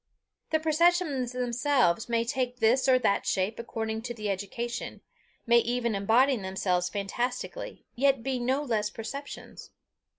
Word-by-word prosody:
The 315 - +2
perceptions 315 -5 +2
themselves 250 - +1
may 230 0 +1
take 250 -1 -1
this 245 +4 +3
or 255 - +6
that 225 -5 +1
shape 195 +4 0
according 220 -1 -3
to 240 0 -5
the 215 -2 -2
education 220 +5 -4 0.4
may 235 0 +6
even 235 -1 0
embody 230 +7 +3
themselves 190 -2 -1
fantastically, 240 - -4
yet 270 -1 +2
be 265 -2 -1
no 260 +4 0
less 215 -6 0
perceptions. 265 +7 -8
240 Hz, 135 wpm, -28 LUFS, 220-265 Hz, 0.4 s, or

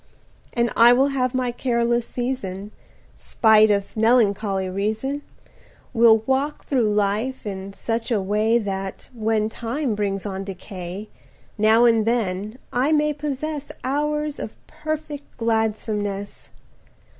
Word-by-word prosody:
110 - - -3
And 235 - 0
I 235 +1 +8
will 270 +3 +3
have 255 -2 -1
my 250 -1 0
careless 235 -1 0
season 215 -6 -4 0.4
Spite 220 -1 +4
of 200 -1 0
melancholy 210 -4 +2
reason, 215 +9 -2 0.7
Will 225 -2 +5
walk 270 +3 -1
through 245 -6 +2
life 210 +6 0
in 195 -1 -5
such 225 +4 -3
a 225 -4 +2
way 210 +4 +2
That, 195 -3 -4
when 220 -2 0
time 235 +3 -2
brings 200 -1 -2
on 195 -1 -4
decay, 190 0 -7 0.5
Now 220 +2 +5
and 225 -2 +3
then 215 -1 -1 0.2
I 260 +5 +2
may 300 -1 +3
possess 295 0 -4
Hours 300 +2 -1
of - - -6
perfect 305 -2 -6
gladsomeness. 215 -3 -2
225 Hz, 125 wpm, -23 LUFS, 205-260 Hz, 0.7 s, I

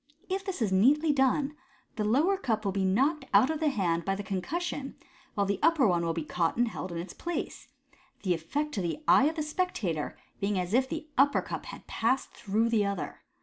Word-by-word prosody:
If 385 +1 -1
this 375 - -2
is 205 - 0
neatly 290 +11 +4
done, 275 +2 +2 0.4
the 215 - -1
lower 285 - +3
cup 225 - -2
will 195 - +1
be 190 0 0
knocked 270 - +2
out 225 +9 +6
of 315 - -3
the 315 - +1
hand 175 -9 0
by 195 +3 0
the 205 - -5
concussion, 275 - -3 0.4
while 200 - +2
the 200 0 -1
upper 325 -3 +4
one 175 -3 +2
will 165 - 0
be 165 -1 -3
caught 165 +4 -1
and 240 0 +3
held 190 -4 -5
in 170 - -4
its 170 +3 -6
place; 345 0 -5 0.6
the 185 -3 +2
effect 285 - -2
to 200 - -1
the 175 - -3
eye 270 - +6
of 315 +2 +1
the 310 - -1
spectator 265 - -2 0.2
being 200 -1 0
as 180 +2 -2
if 260 +2 +3
the 315 -1 -5
upper 285 +1 +4
cup - - -6
had - - -9
passed 255 +4 0
through 220 +3 0
the 225 -3 +3
other. 200 -3 -3
230 Hz, 220 wpm, -29 LUFS, 190-295 Hz, 0.6 s, out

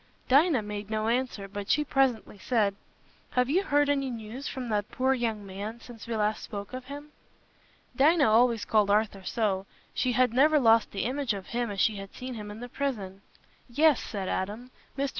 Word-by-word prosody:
Dinah 280 -2 +4
made 210 0 -6
no 220 0 -1
answer, 240 -5 -1
but 200 0 -7
she 300 - +3
presently 260 -8 0
said, 210 -3 +1 0.6
"Have 250 +2 +3
you 365 +5 +3
heard 290 -6 +2
any 275 -2 +1
news 235 +3 -6
from 255 -3 -5
that 210 -1 -1
poor 260 +1 +1
young 225 -5 -2
man, 200 +4 -6
since 235 -1 -12
we 230 - -2
last 215 0 0
spoke 200 +1 -7
of 255 0 -6
him?" 290 +2 -9 0.8
Dinah 295 +3 +5
always 230 0 +3
called 210 -2 +2
Arthur 205 -1 +1
so; 195 -2 -1 0.3
she 250 -1 0
had 250 -1 +3
never 300 +4 +5
lost 225 -3 +4
the 195 - -3
image 260 -2 -1
of 195 -1 -8
him 240 -1 -1
as 200 -1 -5
she 215 0 +2
had 195 0 -9
seen 255 0 -6
him 210 -3 -7
in 210 +2 -9
the 245 - -6
prison. 215 -8 -4 0.5
"Yes," 295 +3 +4
said 195 -3 -5
Adam. 215 +8 -3 0.3
"Mr. 275 0 0
230 Hz, 195 wpm, -28 LUFS, 210-265 Hz, 0.8 s, Dinah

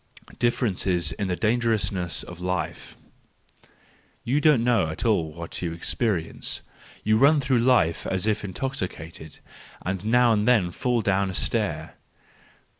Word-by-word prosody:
Differences 95 -8 +1
in 100 - -3
the 90 - -1
Dangerousness 105 -5 0
of 90 0 -10
Life 90 0 -4 1.3
.—You 140 +5 +1
don't 145 -6 +4
know 120 -9 +3
at 80 - -4
all 85 -9 +2
what 85 +1 -7
you 85 -2 -2
experience; 85 0 -1 0.4
you 110 +1 +3
run 145 +3 +5
through 130 -3 +1
life 115 -10 +2
as 95 +1 -1
if 110 -1 0
intoxicated, 90 - -5 0.5
and 95 0 -2
now 120 +2 +4
and 105 -1 +1
then 105 -8 +3
fall 120 +4 0
down 100 -1 +1
a 95 - -5
stair. - - -2
100 Hz, 135 wpm, -25 LUFS, 90-120 Hz, 1.3 s, run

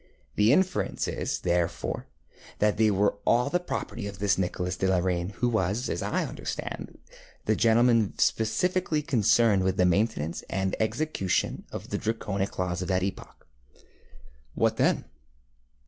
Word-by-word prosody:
The 105 +2 +4
inference 185 +6 +1
is, - - -3
therefore, 85 -1 -1 0.5
that 105 -1 +2
they 110 0 +4
were 100 0 +2
all 125 +4 +2
the 180 - +2
property 120 -10 -4
of 100 -1 -7
this 100 0 +2
Nicholas 90 -1 -2
de 95 - 0
la 95 -1 +3
Reynie, 90 +1 -1
who 120 - 0
was, 110 +1 0
as - - -2
I - - -1
understand, - - -6 0.5
the 110 - +2
gentleman 115 -2 +3
specially 155 +7 +1
concerned 110 -5 +3
with 95 -1 0
the 90 - +4
maintenance 90 -4 0
and 95 0 -1
execution 110 - -1
of - - -7
the - - -1
Draconic 100 -3 -2
laws 90 0 -1
of 90 - -3
that 95 -1 +1
epoch. 95 - -6 0.3
ŌĆØ 65 +1 -20
ŌĆ£What - - +3
then? - - +2
100 Hz, 150 wpm, -27 LUFS, 90-115 Hz, 0.5 s, The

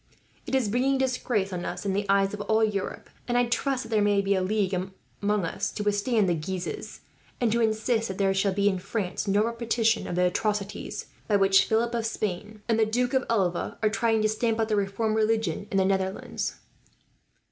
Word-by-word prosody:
It - - 0
is 260 -5 +2
bringing 255 +5 +2
disgrace 250 -7 0
on 175 -1 -3
us 180 +3 -5
in 195 - 0
the 200 +1 -1
eyes 195 0 +3
of 210 - -4
all 220 +1 +2
Europe, 205 -3 -2 0.2
and 245 0 +1
I 245 - +4
trust 260 +2 0
that 225 - -11
there 215 -2 +2
may 205 -1 +3
be 200 0 +2
a 190 - +1
league 195 0 0
made 185 0 -2 0.3
among 205 -2 +1
us 195 +4 -2
to 210 - -3
withstand 205 +1 +2
the 175 - +2
Guises; 175 +3 -5 0.4
and 235 -3 +2
to 235 +1 +2
insist 220 +1 +1
that 190 - -5
there 195 -1 +2
shall 195 +1 +1
be, 200 +1 +1
in 190 -2 +1
France, 200 0 -3
no 200 +2 +3
repetition 230 -1 0
of - - -3
the 180 0 +3
atrocities 205 +2 -2 0.2
by 210 - +2
which 195 -1 +5
Philip 235 +2 +1
of 230 -1 0
Spain, 210 0 -4
and 225 -1 +2
the 220 - +5
Duke 245 +4 0
of 265 -1 +2
Alva, 190 -6 0
are 215 - +4
trying 225 0 +1
to - - +4
stamp 220 +1 0
out 220 0 +1
the 215 - +2
reformed 210 +2 0
religion 220 -4 0
in 195 - -1
the 190 - +3
Netherlands." 190 0 -1
210 Hz, 215 wpm, -27 LUFS, 195-225 Hz, 0.4 s, which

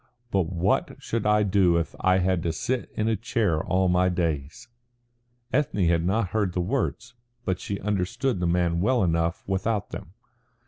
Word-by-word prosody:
But 95 -4 +1
what 90 +1 0
should 115 -2 -2
I 105 0 +4
do 95 -4 +3
if 85 - -2
I 95 0 +3
had 95 -1 +1
to 85 - -1
sit 120 +10 -2
in 110 - 0
a 115 - +2
chair 105 -6 0
all 95 0 +1
my 90 +1 +3
days?" 80 +2 -2 0.9
Ethne 125 -9 +1
had 85 -1 +2
not 95 +2 0
heard 100 -3 0
the 90 - -1
words, 120 +3 -2 0.3
but 95 -1 -1
she 100 -1 -4
understood 105 +4 -1
the 90 - 0
man 85 -1 +1
well 120 +2 +2
enough 85 -1 0
without 100 +2 -1
them. 85 - -8
95 Hz, 175 wpm, -26 LUFS, 85-105 Hz, 0.9 s, I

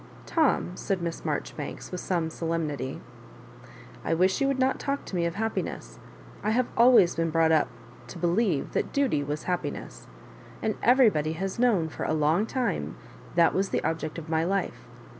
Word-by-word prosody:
"Tom," 310 - +2
said 195 0 -2
Miss 170 -1 -4
Marjoribanks, 150 -1 -4
with 180 - -4
some 170 -3 -1
solemnity, 155 -6 -3 0.6
" - - -18
I 165 - +1
wish 185 +6 +2
you 275 - +3
would 275 -1 +1
not 260 0 +1
talk 280 0 -2
to - - -6
me 170 -1 +1
of 170 - -4
happiness. 195 - -3 0.4
I 210 - -1
have 240 +3 +2
always 235 -7 +6
been 165 0 0
brought 160 0 +3
up 155 -2 +4 0.4
to - - -9
believe 175 -2 +1
that - - -1
duty 260 - +1
was 150 +2 -4
happiness; 180 -1 -4 0.5
and 220 - 0
everybody 210 - +4
has 190 +5 -4
known 220 -10 +3
for - - -5
a - - 0
long 160 +8 +2
time 255 -1 -2 0.4
that 170 -1 +5
was 195 +1 0
the - - -1
object 160 0 -2
of 165 -1 -7
my 160 0 +1
life. 195 +2 -2
175 Hz, 180 wpm, -27 LUFS, 160-220 Hz, 0.6 s, always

